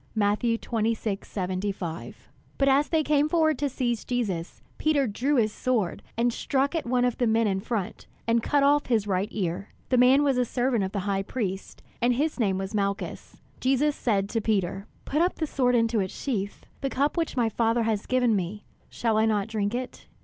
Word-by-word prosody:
(Matt. 205 -1 +2
26:75.)] 205 -6 -2 0.4
But 275 - +2
as 275 +2 +4
they 320 -2 +2
came 300 0 +2
forward 315 -2 +2
to 285 -1 0
seize 240 -3 -1
Jesus, 200 -9 -3 0.2
Peter 300 -3 +2
drew 255 +6 0
his 215 -4 +2
sword, 230 -9 -1 0.2
and 235 0 +2
struck 275 +4 0
at 325 -7 -2
one 250 0 +2
of 245 - -1
the 245 - +2
men 225 +1 +3
in 195 -2 +1
front, 210 -2 -4 0.2
and 230 0 +2
cut 285 +4 +2
off 290 +1 +3
his 225 -4 +2
right 195 0 0
ear. 190 -1 -3 0.2
The 255 - +3
man 260 +3 +6
was 275 -3 +2
a - - +4
servant 245 -2 0
of 190 - -2
the 200 - -2
high 195 0 0
priest, 195 -2 -4 0.2
and 240 +1 +3
his 300 +2 -1
name 195 -5 +1
was 190 +2 -4
Malchus. 200 -1 -3 0.2
Jesus 270 +3 +2
said 200 -4 0
to 225 - -1
Peter: 195 -2 -1 0.2
"Put 300 +3 0
up 355 +2 +2
the 320 - -1
sword 250 -4 +1
into 230 -1 +2
its 190 -2 -3
sheath; 205 -7 -3 0.2
the 275 - -1
cup 280 +3 0
which 330 -5 -2
my 235 -2 +3
Father 230 +1 +1
has 220 -2 -1
given 250 -3 +3
me, 195 +2 -3 0.3
shall 225 -2 0
I 220 - +3
not 210 -1 0
drink 215 0 -1
it? 255 0 -6
230 Hz, 200 wpm, -26 LUFS, 200-260 Hz, 0.4 s, man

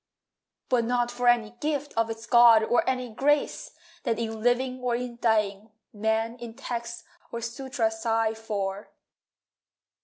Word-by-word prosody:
But 245 -2 +2
not 240 0 0
for 245 0 -2
any 235 -3 +3
gift 295 -1 -2
Of 230 0 +1
its 225 0 -6
god, 235 -1 +7
or 240 +2 +2
any 255 -2 -2
grace 290 +5 +1 0.3
That 230 -4 -1
in 225 -1 -4
living 250 +2 +1
or 245 -1 0
in 240 -1 -5
dying 215 -2 +1 0.2
Men 220 +2 -1
in 235 -2 -8
text 235 0 -5 0.3
or 235 - -4
sutra 235 0 -2
sigh 225 0 0
for. 205 -3 -4
235 Hz, 145 wpm, -27 LUFS, 220-245 Hz, 0.3 s, god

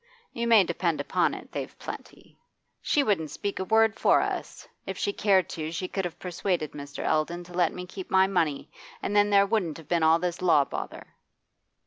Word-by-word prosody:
You 235 0 -2
may 225 -4 +7
depend 170 -2 -1
upon - - +1
it, - - -11
they've - - -6
plenty. - - -10 0.4
She 290 - +2
wouldn't 190 - 0
speak 200 +7 -4
a - - 0
word 220 +1 +3
for - - +5
us; - - -4 0.2
if - - -4
she 405 - -1
cared 195 - +3
to, 155 -1 -4
she 170 +3 -3
could 190 0 -3
have 175 - -5
persuaded 180 -3 -2
Mr. 145 0 -7
Eldon 165 +3 0
to 175 +1 -14
let 175 -1 +2
me 180 - -7
keep 185 +1 -9
my 190 0 +5
money, 165 -7 -1 0.3
and 205 - -2
then 205 0 +5
there 200 -1 +5
wouldn't 195 -7 -1
have 160 -3 -13
been 170 0 +1
all 160 +1 +5
this 175 0 -3
law 165 -6 +4
bother. - - -6
180 Hz, 200 wpm, -27 LUFS, 165-200 Hz, 0.4 s, may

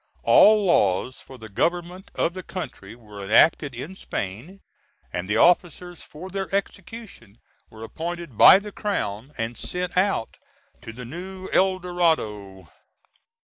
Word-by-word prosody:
All 210 -1 +6
laws 125 - +1
for 130 - -13
the 110 -2 -10
government 175 - -2
of 170 - 0
the 185 - -6
country 180 - -8
were 105 -4 -11
enacted 135 +6 +3
in 155 +10 -7
Spain, 125 - -6 0.5
and 90 +2 -4
the 105 - +1
officers 175 +3 +2
for 180 +5 -10
their 195 0 -4
execution 200 - -6 0.3
were 110 0 -12
appointed 170 +2 -6
by - - +9
the 205 +1 -7
Crown, 135 - -3
and 115 +1 -3
sent 180 +5 -4
out 185 - 0 0.4
to - - -9
the 125 +2 -9
New 185 +7 -8
El 190 0 +3
Dorado. 135 - -2
170 Hz, 140 wpm, -24 LUFS, 115-185 Hz, 0.5 s, by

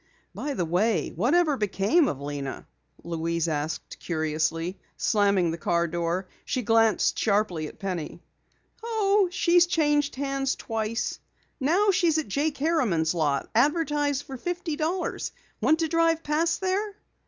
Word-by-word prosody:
"By 290 -2 -4
the 175 - 0
way, 190 +6 +1
whatever 290 - +2
became 210 - +2
of 135 - -3
Lena?" 140 -1 -5 0.4
Louise 170 0 -1
asked 155 0 -3
curiously, 160 +2 -2 0.2
slamming 200 -5 +2
the 165 - -5
car 170 +1 +1
door. 170 +2 -2 0.2
She 255 -3 -2
glanced 225 0 +3
sharply 200 -7 +1
at - - -12
Penny. 180 -5 -4 0.6
"Oh, 420 -4 +2
she's 350 -1 +4
changed 295 -4 +1
hands 275 -1 -1
twice. 225 0 -3 0.4
Now 360 +9 +3
she's 345 -4 +2
at 315 - -1
Jake 290 +6 0
Harriman's 245 - +1
lot, 145 -5 0
advertised 290 +1 +1
for 270 -3 -8
fifty 350 +2 -3
dollars. 335 +4 -2 0.3
Want 315 - +4
to 325 - +1
drive 330 0 +2
past 330 +4 0
there?" 395 +2 -1
255 Hz, 135 wpm, -26 LUFS, -, 0.6 s, she's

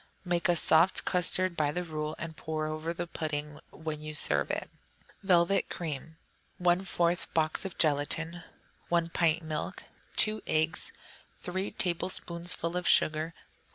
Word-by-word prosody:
Make 175 0 0
a 175 - +4
soft 165 +3 +4
custard 180 0 +2
by 150 -3 +1
the 180 +3 -3
rule, 155 -2 -4
and 165 -1 -6
pour 155 +1 -3
around 155 +2 -4
the 175 - -2
pudding 150 -3 -4
when 155 -1 -6
you 155 0 -6
serve 70 - 0
it. - - -2 0.5
Velvet 185 0 +3
Cream 160 -1 -5 0.4
1/4 175 -1 +1
box 160 +3 +1
of 190 - -6
gelatine. 160 +3 +1 0.5
1 170 -1 +1
pint 165 -1 +1
milk. 155 -1 -4 0.3
2 215 0 +6
eggs. 155 +1 +1 0.5
3 185 +2 -3
tablespoonfuls 170 -1 0
of 180 0 -1
sugar. 155 +2 +3
165 Hz, 135 wpm, -30 LUFS, 155-175 Hz, 0.5 s, 2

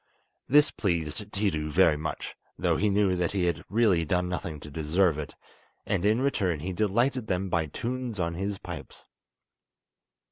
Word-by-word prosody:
This 145 +3 +6
pleased 85 +1 -2
Tiidu 85 -7 -1
very 80 0 +4
much, 80 +1 -4 0.2
though - - +1
he 105 - +2
knew 100 -2 +3
that 90 0 -1
he 95 -3 +1
had 85 -4 -1
really 100 -5 +3
done 90 +3 0
nothing 85 -4 -4
to 75 - -10
deserve 80 +2 +1
it, 75 - -6 0.5
and 95 -3 0
in 110 +4 +3
return 95 - 0
he 95 +3 -3
delighted 115 +5 +1
them 95 0 -1
by 85 -3 +1
tunes 120 - -4
on 85 -1 0
his 100 +3 -3
pipes. 85 -5 -9
90 Hz, 165 wpm, -28 LUFS, 80-105 Hz, 0.5 s, This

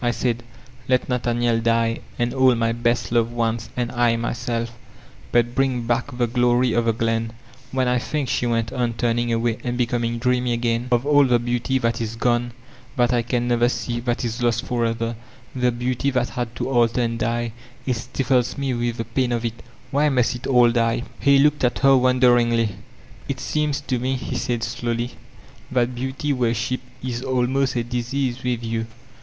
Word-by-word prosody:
I 120 - +2
said, 120 -1 -1 0.5
'Let 130 -1 +2
Nathaniel 120 -1 +1
die 115 0 +1 0.2
and 120 0 0
all 130 -2 +4
my 115 0 +1
best 120 0 0
loved 120 0 +1
ones 115 -1 -1
and 120 -1 -1
I 120 -1 +2
myself, 115 0 -2 0.6
but 120 0 +2
bring 130 -2 +1
back 120 +1 -1
the 120 - +2
glory 120 +1 +2
of 120 0 +1
the 115 - +3
glen 115 0 -1 0.4
I" - - -8
''When 130 -1 +2
I 125 0 +2
think," 145 +2 -2
she 120 - 0
went 115 -2 0
on 120 -2 0
turning 120 +1 0
away 115 0 0
and 120 -1 -2
becom 120 -1 0
ing 115 0 -1
dreamy 125 0 +1
again, 115 0 0
"of 120 +1 +2
all 145 -1 +5
the 125 -2 +4
beauty 120 +2 -1
that 115 -2 0
is 115 0 -3
gone 120 0 0 0.4
that 125 -2 +2
I 120 - +3
can 120 +1 -1
never 120 0 +3
see, 120 -1 -3
that 120 0 -1
is 115 +1 -3
lost 120 +1 +1
forever— 115 -1 -1 0.4
the 125 -1 +2
beauty 125 +3 -1
that 125 -3 0
had 120 +1 -4
to - - -3
alter 120 -1 +3
and 115 -1 -1
die, 120 0 -1 0.2
— 125 - -26
^it 130 - +2
stifles 125 +1 0
me 135 -2 -1
with 120 -1 -1
the 115 - -3
pain 125 +1 0
of 120 -1 -1
it 115 0 -4 0.3
Why 145 +2 +3
must 125 -4 +2
it 125 0 -6
all 125 -3 +5
die? 115 0 +1 0.2
He 140 0 +5
looked 145 +1 +3
at 125 -1 +2
her 135 0 +7
wonderingly. 120 -3 +4 0.6
"It 135 -2 -2
seems 150 +1 -1
to 130 -3 -2
me, 130 +2 -1
he 130 0 -4
said 120 -1 -1
slowly, 120 0 -2 0.6
"that 125 -1 +1
beauty 130 +4 -2
worshq> 120 0 0 0.2
is 125 -2 -3
almost 130 +1 0
a 120 - 0
disease 125 +1 -2
with 120 -2 -1
you. 115 0 -2
120 Hz, 195 wpm, -22 LUFS, 115-125 Hz, 0.6 s, her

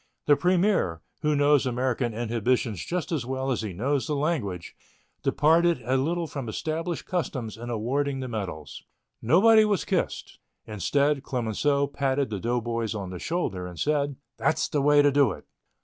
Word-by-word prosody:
The 145 - +6
premier, 180 - +1 0.2
who 150 0 +1
knows 145 -1 +3
American 125 -1 -1
inhibitions 115 -1 -1
just 180 -1 -3
as 155 -7 -1
well 130 +2 -2
as 125 - -1
he 105 -3 -4
knows 130 +7 -1
the 150 - -1
language, 135 - -2 0.5
departed 165 0 +3
a 130 +2 +1
little 165 +6 0
from 140 -6 -6
established 160 +5 -3
customs 130 - -3
in 120 +2 -8
awarding 135 +5 -1
the 130 - -4
medals. 90 - -6 0.4
Nobody 215 - +6
was 205 -3 0
kissed. - - -2 0.3
Instead 140 +7 +1
Clemenceau 135 +3 0
patted 140 -2 -1
the 100 - -3
doughboys 115 0 -2
on 95 -3 -5
the 90 - -6
shoulder 95 - -2
and 90 -2 -10
said: 145 -2 0 0.2
"That's - - +1
the 145 - 0
way 145 +1 +5
to 145 - +4
do 140 -7 +3
it." - - -12
135 Hz, 165 wpm, -26 LUFS, 115-150 Hz, 0.5 s, The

